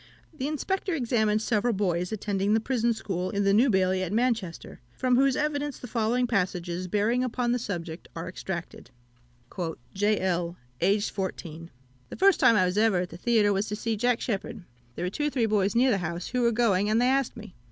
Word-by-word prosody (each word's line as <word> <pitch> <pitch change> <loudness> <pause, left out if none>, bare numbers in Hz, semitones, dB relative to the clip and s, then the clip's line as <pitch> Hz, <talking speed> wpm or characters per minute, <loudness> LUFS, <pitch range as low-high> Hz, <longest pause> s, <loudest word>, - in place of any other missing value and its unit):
The 270 -2 -3
Inspector 380 +6 -2
examined 225 -7 +1
several 225 +2 +1
boys 180 -3 -1
attending 205 -1 0
the - - +3
prison 235 0 0
school 185 -5 -3
in 200 0 -1
the 195 0 +3
New 240 +6 +5
Bailey 190 -2 +2
at 185 -1 -3
Manchester, 225 -6 -1 0.2
from 255 -1 +2
whose 270 +1 +3
evidence 290 -1 -1
the - - -9
following 235 +1 0
passages 180 -5 -1
bearing 215 +6 +1
upon 245 -1 -1
the 245 - +1
subject 170 -6 -5
are 165 - -5
extracted: 185 -1 -6 1.0
"J. 205 +2 +1
L. 175 -2 -1 0.2
(aged 200 +4 +2
14). 165 -4 -5 0.4
The - - -7
first 390 +1 +4
time 230 - +6
I 185 -3 +4
was 180 +3 0
ever 215 -5 +3
at 180 - -4
the 170 - -8
theatre 215 -1 +3
was 195 +2 -1
to 210 - -3
see 225 +1 -2
Jack 245 +2 +1
Sheppard. 220 -1 -3 0.3
There 175 - -3
were 180 - -2
two 295 +8 -1
or - - +1
three 250 -5 +1
boys 205 -2 +1
near 255 +3 +4
to - - +3
the 205 - +2
house 170 0 -4
who 250 0 -1
were 235 -1 +3
going, 210 -4 +2
and 220 +1 +3
they 245 - +3
asked 265 -1 +1
me. 215 -4 -10
215 Hz, 210 wpm, -27 LUFS, 185-245 Hz, 1.0 s, time